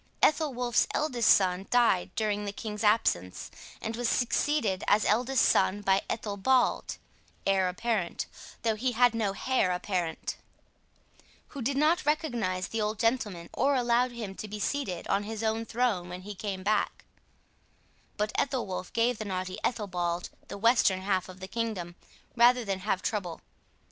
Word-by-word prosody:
Ethelwolf's 265 -6 +2
eldest 250 -7 +1
son 190 0 +4
died 230 - +3
during 210 -1 0
the 200 - -3
king's 210 +1 -5
absence, 210 - +1 0.3
and 225 +1 -3
was 240 0 0
succeeded 245 -5 +1
as 210 +1 +4
eldest 250 +5 +3
son 190 +2 +3
by 195 -1 +3
Ethelbald 225 +4 +1 0.5
(heir 190 -2 +3
apparent, 195 -1 -2 0.4
though 225 -1 +2
he 245 +4 -1
had 245 0 +4
no 215 -4 0
hair 250 -4 +1
apparent), 180 -2 -2 1.1
who 280 - -7
did 270 +3 -1
not 315 +5 +3
recognize 240 - -1
the 225 - -2
old 210 +1 -1
gentleman 215 -7 0
or 280 0 +2
allow 245 0 +2
him 230 -5 -6
to 215 - -7
be 210 +1 -6
seated 205 -8 -2
on 195 - +1
his 220 +1 -5
own 225 +1 0
throne 225 -7 0
when 180 +1 -7
he 205 +2 -7
came 195 -1 -5
back; 210 +1 0 1.1
but 210 +1 0
Ethelwolf 230 -10 -2
gave 235 0 +1
the 215 - -4
naughty 185 -1 -4
Ethelbald 180 -6 -2 0.2
the - - -7
western 205 -4 +3
half 190 -1 0
of 185 0 -11
the 190 - -7
kingdom 200 -5 -3 0.4
rather 245 0 +5
than 195 -2 -2
have 190 -1 -1
trouble. 180 -6 -3
215 Hz, 155 wpm, -29 LUFS, 190-240 Hz, 1.1 s, rather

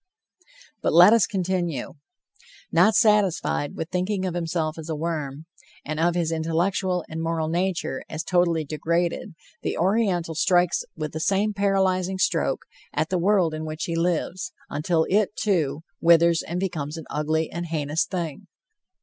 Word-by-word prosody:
But - - +1
let 180 +6 +8
us 230 -5 +4
continue. 180 -7 -2 0.8
Not 215 - +4
satisfied 200 -8 +2
with 160 +2 -5
thinking 185 +1 -1
of 180 - -2
himself 165 -2 -2
as 160 0 -8
a 160 - -1
worm, 155 -2 -4 0.4
and 155 +1 -3
of 170 +1 +2
his 170 -2 0
intellectual 175 +3 0
and 160 +1 -5
moral 165 -1 -1
nature 175 -6 -1
as 155 +1 -4
totally 170 -3 +1
degraded, 170 +4 -1 0.3
the - - -2
Oriental 185 -3 +1
strikes 175 +2 +2
with 155 -2 -4
the 155 - -3
same 200 +5 +1
paralyzing 190 -2 +1
stroke, 185 - 0 0.3
at 155 +2 -1
the 185 - +1
world 185 -3 +2
in 155 0 -4
which 155 0 -5
he 170 - -2
lives, 175 +2 -1 0.2
until 160 +3 +1
it, 210 +1 +1
too, 160 -7 0 0.2
withers 170 0 +5
and 175 +2 -4
becomes 160 -5 -3
an 160 - -8
ugly 155 +1 -1
and 170 0 -4
heinous 155 -1 0
thing. 170 -6 -5
170 Hz, 155 wpm, -24 LUFS, 160-185 Hz, 0.8 s, let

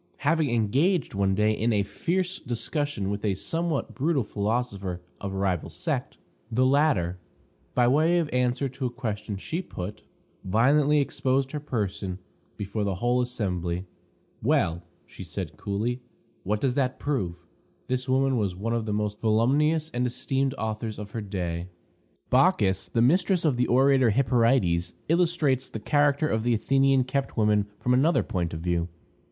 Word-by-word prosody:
Having 155 -1 +3
engaged 135 - +1
one 100 -1 +1
day 105 +2 +3
in 110 +2 0
a 105 -2 +2
fierce 180 - -2
discussion 120 -3 -2
with 100 0 -4
a 100 -3 +1
somewhat 165 - -2
brutal 145 -1 +1
philosopher 100 -4 -2 0.2
of 100 - -4
a 95 - -4
rival 95 -4 -1
sect, - - -3 0.3
the 125 +3 +3
latter, 130 - +2 0.6
by 125 -1 +4
way 155 +7 +4
of 170 -3 +1
answer 125 +2 +1
to 130 0 -3
a - - -3
question 110 -4 -4
she 160 - -3
put, 100 - -7 0.4
violently 140 +9 +3
exposed 135 -1 0
her 150 - -3
person 100 -9 -3 0.4
before 100 +1 -3
the 100 -2 -1
whole 120 +6 +1
assembly. 90 -7 -2 0.6
"Well," 85 +1 +1 0.3
said - - -6
she, - - -24
coolly, 115 +5 -2 0.4
"what 105 +2 -1
does 130 -2 +1
that 130 -1 0
prove?" 105 -13 -2 0.5
This 130 +1 -2
woman 135 0 +2
was 100 -5 -1
one 110 +5 -2
of 115 -2 -1
the 105 - -1
most 105 0 -2
voluminous 145 +9 +2
and 125 +1 0
esteemed 135 +2 -1
authors 110 0 -3
of 105 -1 -7
her 115 - -4
day. 90 -4 -3 0.6
Bacchis, 105 - +3
the 115 - +2
mistress 180 +6 +3
of 145 -5 +3
the 125 0 +1
orator 130 0 +4
Hyperides, 115 -8 +2 0.2
illustrates 160 -6 +2
the 110 - -6
character 145 +4 +2
of 110 -6 0
the 120 +1 +2
Athenian 135 +3 +3
kept 135 +1 -3
woman 105 -2 +3
from 125 - +1
another 150 +7 +3
point 85 -3 -2
of 80 - -5
view. 85 -1 0
120 Hz, 160 wpm, -26 LUFS, 100-140 Hz, 0.6 s, by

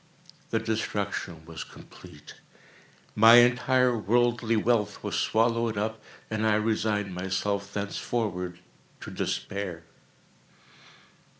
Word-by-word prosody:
The 115 - 0
destruction 105 -7 -3
was 80 -1 -7
complete. - - -14 0.8
My 115 +2 +8
entire 125 +1 +4
worldly 115 +2 +1
wealth 110 -2 0
was - - -4
swallowed 115 -1 +1
up, 110 +1 -2 0.3
and 110 0 -2
I 110 -1 +3
resigned 105 -2 0
myself 100 +2 -2
thenceforward 100 -3 -3 0.4
to - - -8
despair. 95 -4 -4
110 Hz, 95 wpm, -27 LUFS, 100-115 Hz, 0.8 s, My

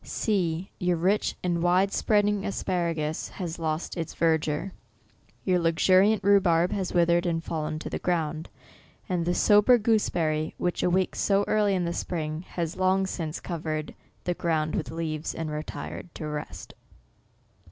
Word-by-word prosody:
See 180 -4 -1
— - - -39
your 180 -1 +1
rich 190 +5 +1
and 175 -2 0
wide 185 +3 +3
spreading 205 -2 +2
asparagus 170 -5 -2
has 175 -3 -6
lost 160 0 -2
its 165 -3 -4
verdure 160 +2 +1 0.4
— - - -35
your 185 -2 +3
luxuriant 185 +5 +4
rhubarb 180 -4 +4
has 190 -3 -2
withered 175 0 +3
and 165 -1 -1
fallen 155 -2 -3
to 155 - -6
the - - -3
ground 160 -3 -1 0.3
— - - -30
and 175 -2 0
the 175 +1 +1
so 210 -1 +5
ber 245 +4 +6
gooseberry, 170 -9 0
which 175 - -1
awakes 185 +1 +1
so 200 0 +2
early 210 -2 +2
in 180 -2 0
the 170 - -2
spring, 155 -3 -3
has 170 -2 -2
long 190 +1 +2
since 165 -4 -4
covered 155 -3 -4 0.3
the 180 - 0
ground 160 -3 -1
with - - -2
leaves, 160 -1 -3
and 160 -1 -4
retired 150 +3 -6
to 155 - -5
rest. 150 - -6
170 Hz, 165 wpm, -27 LUFS, 160-190 Hz, 0.4 s, ber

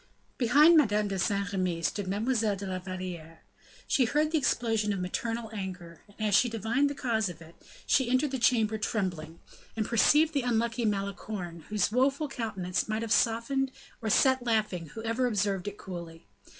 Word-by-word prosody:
Behind 290 +7 +6
Madame 210 -8 +3
de 195 -1 -2
Saint 200 +2 0
Remy 180 -4 -1
stood 200 +4 -1
Mademoiselle 215 +1 0
de 195 +1 -7
la 185 -1 -3
Valliere. 180 -3 -7 0.4
She 260 - +2
heard 300 +6 +1
the 320 - +2
explosion 225 -5 0
of 200 - -2
maternal 225 +5 -3
anger, 180 -5 -7 0.2
and 215 -1 0
as - - -1
she 240 +5 +5
divined 230 +6 0
the 285 - -5
cause 225 -7 0
of 170 -2 -9
it, 165 0 -14 0.3
she 260 -3 +2
entered 260 +3 +2
the 265 - -2
chamber 220 -2 +2
trembling, 175 -7 -3 0.4
and 220 -1 -1
perceived 300 +8 +4
the 280 - +1
unlucky 235 -1 0
Malicorne, 195 -4 -4
whose 210 -1 +1
woeful 275 +5 +1
countenance 215 -8 -3
might 215 +1 -1
have 225 -1 +1
softened 240 +5 +1 0.3
or 220 - -2
set 260 +4 +4
laughing 215 -8 0
whoever 230 +3 -1
observed 200 -4 -1
it 205 0 -5
coolly. 170 - -9
215 Hz, 175 wpm, -29 LUFS, 185-245 Hz, 0.4 s, Behind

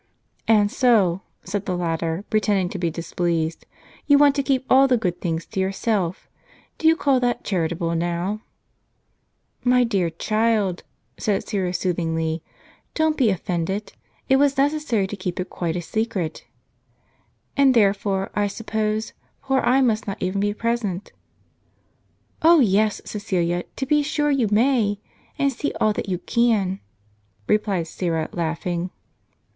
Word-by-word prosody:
"And 210 -2 +4
so," 200 -8 +3 0.2
said 195 +1 -4
the 180 - -1
latter, 165 +1 -2
pretending 205 -4 +2
to 190 - -6
be 170 -1 0
displeased, 165 0 -2 0.4
"you 285 -1 +6
want 285 -1 +6
to 280 - 0
keep 265 -2 0
all 270 +1 +6
the 255 -2 +3
good 180 -5 -2
things 165 -2 -2
to - - -5
yourself. 190 -1 -1 0.5
Do 320 - +2
you 325 - +6
call 275 -5 +2
that 245 -1 0
charitable, 170 -2 -1
now? 175 +5 -2 0.6
" - - -46
"My 250 0 +5
dear 195 -7 +1
child," 215 +1 0 0.4
said 205 -2 -1
Syra, 190 -4 -1
soothingly, 165 -3 -1 0.5
"don't 315 -1 +2
be 255 -7 +3
offended. 190 +2 -2 0.3
It 265 - +5
was 280 0 +3
necessary 280 -7 +1
to 195 - -5
keep 185 -2 -4
it 185 - -4
quite 170 -2 -2
a 175 - -3
secret." 190 -5 -3 1.1
"And 275 -2 +4
therefore, 195 -2 +2
I 205 -1 +1
suppose, 215 0 -2 0.3
poor 270 -1 +2
I 265 +2 +3
must 220 -4 +1
not 195 - -4
even 185 +2 -1
be 205 0 +1
present? 220 -5 -2 0.7
" - - -42
"Oh, 330 +1 +7
yes, 215 -3 +2
Ceecilia, 175 -4 -1
to 265 - -2
be 295 +2 +3
sure 295 0 0
you 265 -5 +2
may; 215 -2 +2 0.4
and 275 -1 +1
see 285 +4 -2
all 215 - +3
that 205 - -4
you 180 - 0
can," 205 -3 +1 0.7
replied 205 - +1
Syra, 165 -1 -2
laughing. 170 +1 -2
205 Hz, 150 wpm, -23 LUFS, 175-240 Hz, 1.1 s, Oh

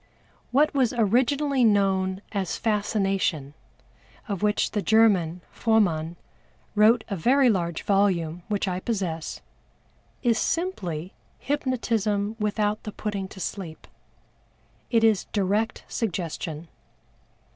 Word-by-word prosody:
What 290 +4 +3
was 260 -4 +2
originally 255 +5 +2
known 195 -3 +2
as 195 -4 -2
Fascination, 195 -9 0 0.7
of 200 -3 -3
which 210 0 +1
the 210 - -1
German, 195 -7 +3
FROMANN, 175 -8 +1 0.6
wrote 220 +2 +5
a 200 - -1
very 250 - +4
large 170 -4 -2
volume 180 -5 +1
which 205 -1 -1
I 180 -1 -1
possess, 185 -7 -3 0.8
is 235 -3 +3
simply 185 - -2 0.2
Hypnotism 225 -6 -1
without 210 0 0
the 210 - -6
putting 200 -2 -4
to 190 - -12
sleep. 175 -2 -6 1.0
It 230 -2 +3
is 220 -4 +3
direct 210 +3 -1
Suggestion. 170 -5 -4
205 Hz, 105 wpm, -25 LUFS, 185-225 Hz, 1.0 s, wrote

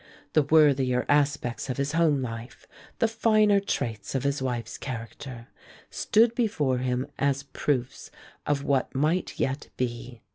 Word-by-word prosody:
The 155 - +5
worthier 140 -4 +3
aspects 145 -4 +1
of 130 - -2
his 140 +1 -1
home 155 -4 +2
life, 115 0 -7 0.3
the 230 - +3
finer 215 -2 +3
traits 115 - -3
of 135 - 0
his 140 0 0
wife's 120 -3 -3
character, 120 0 -7 0.4
stood 230 +2 +3
before 155 - 0
him 125 0 -1
as 140 0 +1
proofs 135 -2 -2 0.4
of 145 -1 0
what 140 -2 0
might 155 +6 0
yet 135 +2 -1
be. 120 -1 -4
140 Hz, 140 wpm, -27 LUFS, 125-150 Hz, 0.4 s, The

